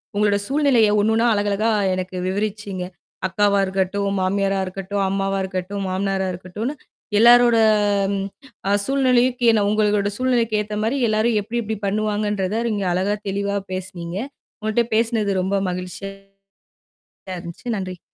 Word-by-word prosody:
உங்களோட 205 -1 +3
சூழ்நிலையை 270 -7 +3
ஒண்ணுன்னா 220 +2 +2
அழகா 205 0 0
அழகா 215 +3 +1 0.2
எனக்கு 185 0 -4
விவரிச்சிங்க. 200 -1 -3 0.4
அக்காவா 200 +1 +2
இருக்கட்டும், 195 +1 -1
மாமியாரா 195 +1 +1
இருக்கட்டும், 195 +2 -4
அம்மாவா 195 0 -1
இருக்கட்டும், 190 +1 -4
மாமனாரா 190 0 -1
இருக்கட்டும், 185 +8 -5 0.5
எல்லாரோட 240 0 +7 1.1
அ - - +2
சூழ்நிலைக் 255 -2 +2
கே 235 - +5 0.2
உங்களோட 210 -1 +2
சூழ்நிலைக்கு 235 -4 +1
ஏத்த 210 0 -5
மாரி 230 +6 0
எல்லாரும் 215 +1 +2
எப்படி, 230 +4 -3
எப்படி 220 0 -3
பண்ணுவாங்கன்றதை 210 0 -1
நீங்க 205 -3 -1
அழகா, 195 +3 0
தெளிவா 200 +1 -1 0.2
பேசினீங்க. 180 -1 -5 0.4
உங்கள்ட்ட 220 +2 +1
பேசினது 220 -4 +1
ரொம்ப 195 +2 0
மகிழ்ச்சியா 180 +2 -6 1.3
இருந்துச்சு. 170 +8 -10
நன்றி. 185 -2 -5
205 Hz, 120 wpm, -21 LUFS, 190-220 Hz, 1.3 s, எல்லாரோட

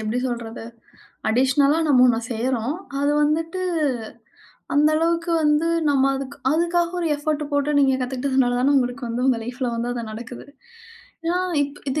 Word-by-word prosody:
எப்பிடி 220 +3 -2
சொல்றது, 235 -2 -5 0.7
அடிஷ்னலா 265 +6 +3
நம்ம 260 -4 +5
ஒண்ண 235 -2 +3
செய்றோம். 245 +3 -1 0.2
அது 285 +1 +2
வந்துட்டு 325 +5 -1 1.1
அந்த 295 +1 +5
அளவுக்கு 335 +1 0
வந்து 300 +2 +2 0.2
நம்ம 275 -2 +3
அதுக்கு 275 +1 -6 0.2
அதுக்காக 340 +1 +1
ஒரு 335 - 0
எஃபோர்ட்டு 300 0 -2
போட்டு 285 +1 0
நீங்க 265 -1 +4
கத்துக்கிட்டதுனால 255 -1 0
தான 280 +3 +3
உங்களுக்கு 250 0 -1
வந்து 240 +2 -2
உங்க 255 -3 +3
லைஃப்ல 250 +1 -3
வந்து 235 +1 -2
அது 235 -1 -4
நடக்குது. 240 +4 -8 0.8
ஏன்னா, 345 +2 +1 0.3
இப் 285 +1 -5
இது 295 +4 -1
275 Hz, 150 wpm, -22 LUFS, 245-300 Hz, 1.1 s, நம்ம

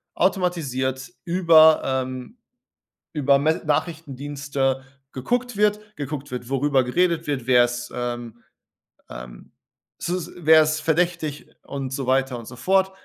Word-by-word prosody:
automatisiert 155 -7 -1
über, 165 -3 +6
ähm 130 - -3 0.8
über 140 -2 +3
Messe 155 +3 0
Nachrichtendienste 140 -3 -2 0.3
geguckt 245 - -2
wird. 210 0 +2 0.2
Geguckt 145 0 -5
wird, 125 -1 -6
worüber 135 -1 +2
geredet 170 +5 +1
wird, 135 -5 -3
wer 125 -2 +6
ist, 120 0 -4
ähm 120 -1 -5 0.7
ähm, - - -10 0.5
sus 175 -1 -3
wer 160 -2 +6
ist 155 0 -1
verdächtig 160 -2 -1
und 135 -2 -5
so 135 -2 -4
weiter 130 -1 +1
und 115 - -10
so 125 - -9
fort. 190 +8 +2
145 Hz, 125 wpm, -23 LUFS, 130-170 Hz, 0.8 s, über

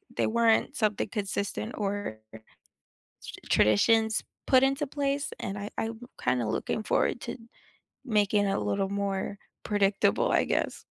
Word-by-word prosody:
they - - +1
weren't 230 0 +2
something 210 -2 0
consistent 205 +2 -3
or 205 - -3
r 110 - -9 0.8
s - - -13 0.2
traditions 220 - +4 0.3
put 260 -1 +5
into 275 +2 +2
place, 280 0 -1
and 200 -1 -4
I 205 0 -5
I'm 225 0 -3 0.2
kinda 125 -2 +1
looking 110 - -2
forward 235 - +1
to - - -5 0.7
making 210 -3 +2
it 195 - +1
a - - -2
little 195 -1 0
more 200 0 -2 0.3
predictable, 200 -1 +2
I - - +3
guess. - - -2
205 Hz, 140 wpm, -28 LUFS, 195-225 Hz, 0.8 s, put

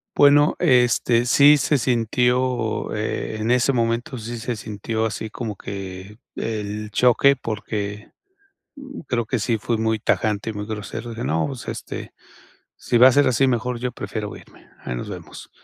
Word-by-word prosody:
Bueno, 145 +1 +5
este, 120 -5 +3
sí 145 +4 +7
se 145 +1 +2
sintió, 125 -1 0
eh, 110 0 -3
en 110 +2 -1
ese 125 +2 +3
momento 115 +1 -1
sí 120 +1 -6
se 120 +1 -3
sintió 110 +1 -3
así 110 0 -4
como 110 -1 -5
que 95 +1 -8 0.2
el 105 -1 -4
choque, 125 +5 +4
porque, 105 -2 -5 0.7
mm, 275 -1 -9
creo 120 -3 -1
que 125 - -1
sí 115 +1 0
fui 115 +2 -1
muy 110 0 0
tajante 105 0 0
y - - -5
muy 105 0 -4
grosero. 110 +2 -6
Dije: 115 +1 -5
"No, 80 +1 0
pues, 135 -3 -8
este, - - -6 0.6
si 120 - 0
va 125 +2 +9
a - - +6
ser 145 +3 +4
así, 130 +2 +3
mejor 125 0 -1
yo 125 +1 -2
prefiero 105 -1 -5
irme, - - -18 0.2
ahí 65 - -4
nos - - -6
vemos". - - -9
115 Hz, 170 wpm, -22 LUFS, 105-125 Hz, 0.7 s, va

